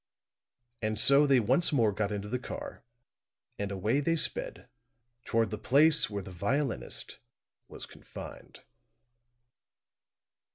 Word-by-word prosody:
And 110 Hz, -1 st, -1 dB
so 140 Hz, +5 st, +6 dB
they 135 Hz, -2 st, +5 dB
once 165 Hz, -, +3 dB
more 115 Hz, -7 st, +3 dB
got 105 Hz, +1 st, -2 dB
into 105 Hz, 0 st, -4 dB
the 125 Hz, +4 st, -2 dB
car; -, -, -8 dB, 0.8 s
and 100 Hz, -1 st, -2 dB
away 105 Hz, +8 st, 0 dB
they 165 Hz, +3 st, +1 dB
sped -, -, -2 dB, 0.6 s
toward 115 Hz, -2 st, 0 dB
the 105 Hz, -, -4 dB
place 145 Hz, +6 st, +4 dB
where 100 Hz, -2 st, -4 dB
the 95 Hz, -, -10 dB
violinist 115 Hz, +9 st, -2 dB, 0.5 s
was -, -, -8 dB
confined. -, -, -11 dB
115 Hz, 120 wpm, -30 LUFS, 105-145 Hz, 0.8 s, so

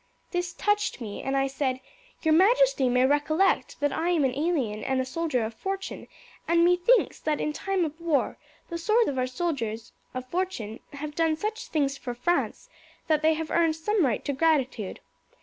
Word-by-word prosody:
This 355 Hz, -1 st, -2 dB
touched 415 Hz, -4 st, 0 dB
me, 215 Hz, -4 st, -6 dB
and 270 Hz, +1 st, -1 dB
I 270 Hz, -, +2 dB
said, 265 Hz, -1 st, -1 dB, 0.4 s
'Your 315 Hz, -1 st, +4 dB
majesty 420 Hz, -, +4 dB
may 250 Hz, +1 st, +4 dB
recollect 295 Hz, +6 st, +2 dB
that 290 Hz, -1 st, +2 dB
I 335 Hz, +2 st, 0 dB
am 330 Hz, -5 st, +3 dB
an 255 Hz, -, +1 dB
alien 275 Hz, -8 st, -1 dB
and 265 Hz, 0 st, 0 dB
a 260 Hz, -, 0 dB
soldier 260 Hz, -2 st, -1 dB
of 225 Hz, -, -5 dB
fortune, 385 Hz, -, -5 dB, 0.4 s
and 340 Hz, 0 st, +4 dB
methinks 360 Hz, +8 st, +3 dB
that 305 Hz, -2 st, -1 dB
in 300 Hz, -, -1 dB
time 385 Hz, +1 st, 0 dB
of 315 Hz, +2 st, -7 dB
war 325 Hz, -5 st, 0 dB, 0.3 s
the 335 Hz, -1 st, -4 dB
swords 440 Hz, +7 st, +3 dB
of 265 Hz, -2 st, -2 dB
our 255 Hz, -, +1 dB
soldiers 250 Hz, -6 st, -3 dB, 0.2 s
of 255 Hz, 0 st, -4 dB
fortune 340 Hz, -, -3 dB
have 295 Hz, +1 st, -6 dB
done 325 Hz, 0 st, +2 dB
such 435 Hz, +5 st, -4 dB
things 280 Hz, -3 st, 0 dB
for 245 Hz, -2 st, -5 dB
France 345 Hz, -, -1 dB, 0.4 s
that 310 Hz, -2 st, +2 dB
they 315 Hz, +1 st, +4 dB
have 315 Hz, 0 st, -4 dB
earned 330 Hz, -2 st, +3 dB
some 395 Hz, +4 st, +1 dB
right 245 Hz, -7 st, 0 dB
to 285 Hz, -, -1 dB
gratitude. 265 Hz, -, 0 dB
310 Hz, 185 wpm, -27 LUFS, 260-350 Hz, 0.4 s, Your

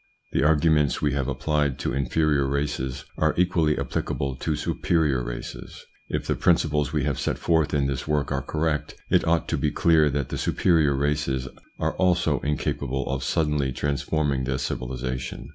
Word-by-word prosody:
The -, -, +1 dB
arguments 75 Hz, -1 st, +3 dB
we 75 Hz, -2 st, +1 dB
have 70 Hz, -3 st, -1 dB
applied 75 Hz, -4 st, 0 dB
to 70 Hz, -, -2 dB
inferior 70 Hz, 0 st, +1 dB
races 65 Hz, -2 st, -2 dB
are 80 Hz, 0 st, +2 dB
equally 85 Hz, -4 st, +2 dB
applicable 70 Hz, 0 st, -2 dB
to 80 Hz, +3 st, -1 dB
superior 75 Hz, -5 st, 0 dB
races. -, -, -7 dB, 0.2 s
If -, -, -2 dB
the -, -, +1 dB
principles 75 Hz, -4 st, +2 dB
we 75 Hz, -3 st, 0 dB
have -, -, -1 dB
set -, -, -1 dB
forth 80 Hz, -3 st, +1 dB
in 70 Hz, -2 st, +1 dB
this 70 Hz, 0 st, -2 dB
work 75 Hz, -2 st, 0 dB
are 70 Hz, -1 st, 0 dB
correct, 75 Hz, 0 st, -2 dB, 0.2 s
it -, -, +3 dB
ought 85 Hz, 0 st, +2 dB
to 80 Hz, -, 0 dB
be 75 Hz, -, +1 dB
clear 80 Hz, 0 st, +4 dB
that 70 Hz, -1 st, -2 dB
the -, -, -3 dB
superior 80 Hz, -6 st, +2 dB
races 70 Hz, -2 st, 0 dB, 0.3 s
are -, -, -1 dB
also 90 Hz, -5 st, +2 dB
incapable 70 Hz, -2 st, -2 dB
of 65 Hz, -1 st, -2 dB
suddenly 75 Hz, -2 st, 0 dB
transforming 70 Hz, 0 st, -1 dB
their 65 Hz, 0 st, -1 dB
civilisation. 65 Hz, +1 st, -4 dB
75 Hz, 165 wpm, -25 LUFS, 65-80 Hz, 0.3 s, clear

